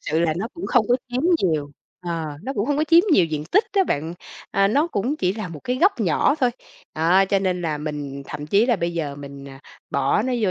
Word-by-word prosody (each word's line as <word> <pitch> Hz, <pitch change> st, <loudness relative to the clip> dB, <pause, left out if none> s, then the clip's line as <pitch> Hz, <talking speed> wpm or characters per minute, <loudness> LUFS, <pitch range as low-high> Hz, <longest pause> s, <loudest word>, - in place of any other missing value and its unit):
Sự 160 Hz, +2 st, -1 dB
là 160 Hz, -2 st, +1 dB
nó 215 Hz, +6 st, -3 dB
cũng 340 Hz, -, -5 dB
không 235 Hz, -5 st, +3 dB
có 245 Hz, -, +4 dB
chiếm 250 Hz, +3 st, -2 dB, 0.2 s
nhiều. 155 Hz, -, 0 dB, 0.3 s
Ờ, 165 Hz, -4 st, -4 dB
nó 270 Hz, -, -3 dB
cũng 205 Hz, +4 st, 0 dB
hông 290 Hz, -, +1 dB
có 310 Hz, -, +2 dB
chiếm 335 Hz, +2 st, +6 dB
nhiều 185 Hz, -, +5 dB
diện 155 Hz, -2 st, -4 dB
tích 410 Hz, +4 st, +5 dB
á 390 Hz, -2 st, +3 dB
bạn, 160 Hz, -, -2 dB, 0.4 s
à, 195 Hz, 0 st, +3 dB
nó 290 Hz, +9 st, +2 dB
cũng 260 Hz, +1 st, -2 dB
chỉ 185 Hz, -7 st, 0 dB
là 210 Hz, -3 st, -5 dB
một 155 Hz, -3 st, -9 dB
cái 250 Hz, -, -1 dB
góc 370 Hz, -, +2 dB
nhỏ 205 Hz, -, +2 dB
thôi. 255 Hz, -5 st, +1 dB, 0.4 s
Đó, 175 Hz, +5 st, +4 dB
cho 195 Hz, +1 st, +2 dB
nên 185 Hz, -2 st, -1 dB
là 155 Hz, -3 st, -2 dB
mình 145 Hz, -2 st, -5 dB
thậm 150 Hz, 0 st, -6 dB
chí 205 Hz, +8 st, +3 dB
là 240 Hz, -, +3 dB
bây 170 Hz, -1 st, -2 dB
giờ 145 Hz, -4 st, -3 dB
mình, 140 Hz, -1 st, -9 dB
à, 135 Hz, 0 st, -12 dB, 0.3 s
bỏ 140 Hz, +9 st, +1 dB
nó 255 Hz, -, -1 dB
vô 195 Hz, -, +2 dB
180 Hz, 250 wpm, -22 LUFS, 150-245 Hz, 0.4 s, chiếm